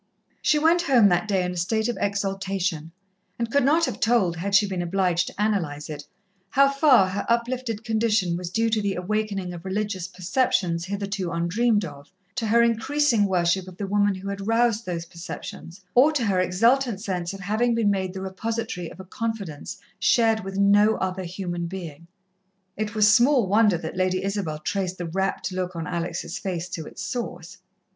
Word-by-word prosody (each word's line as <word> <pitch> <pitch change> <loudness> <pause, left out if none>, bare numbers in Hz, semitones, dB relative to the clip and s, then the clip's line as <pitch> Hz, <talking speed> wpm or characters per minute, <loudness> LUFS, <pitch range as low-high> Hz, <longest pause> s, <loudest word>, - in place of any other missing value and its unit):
She 305 - +3
went 325 +3 +4
home 250 -10 +5
that 180 +4 +1
day 195 -3 +1
in 180 - -2
a - - -7
state 220 +6 0
of 240 - -1
exaltation, 195 -5 -2 0.5
and 235 -1 -3
could 280 +1 +3
not 315 +5 +4
have - - -5
told, 225 -7 +2
had 195 +4 -1
she 205 +1 +6
been 190 -2 -3
obliged 180 0 +1
to - - -8
analyse 170 -9 -1
it, 145 -1 -7 0.4
how 275 +4 +4
far 275 -8 +5
her 200 +2 -3
uplifted 235 -1 -1
condition 220 -5 +1
was 175 0 -4
due 225 +4 0
to 220 -1 +2
the 200 -1 -1
awakening 195 -1 -2
of 170 -1 -9
religious 190 -1 -2
perceptions 185 -3 0
hitherto 200 -2 -3
undreamed 205 +6 +1
of, 145 -2 -11 0.2
to 235 -4 -2
her 235 +2 +4
increasing 235 0 +2
worship 185 -1 +1
of 185 -1 -11
the 205 - -3
woman 205 0 +2
who 190 +1 -8
had 200 0 -5
roused 230 -1 +2
those 170 -2 -3
perceptions, 170 +1 -9
or 270 +5 +6
to 260 -6 0
her 195 -3 +1
exultant 230 +5 +2
sense 180 -4 -3
of 195 -1 -8
having 220 +5 +1
been 220 -3 +2
made 190 -2 -1
the 190 - -5
repository 195 -2 -4
of - - -14
a 190 - -8
confidence 200 -7 -5 0.2
shared 225 -2 +3
with 195 0 -6
no 205 +2 +5
other 185 0 -3
human 175 -1 -4
being. 170 -3 -8 0.7
It 215 0 -3
was 210 -1 +5
small 250 0 +4
wonder 205 -1 +3
that 160 +1 -6
Lady 185 0 0
Isabel 195 -6 -2
traced 185 +3 -3
the 175 - -4
rapt 190 +3 -2
look 185 -1 -3
on 165 -1 -4
Alex' 175 -1 -4
face 180 -4 -3
to 160 -2 -6
its - - -8
source. 195 -6 -5
195 Hz, 185 wpm, -24 LUFS, 180-225 Hz, 0.7 s, she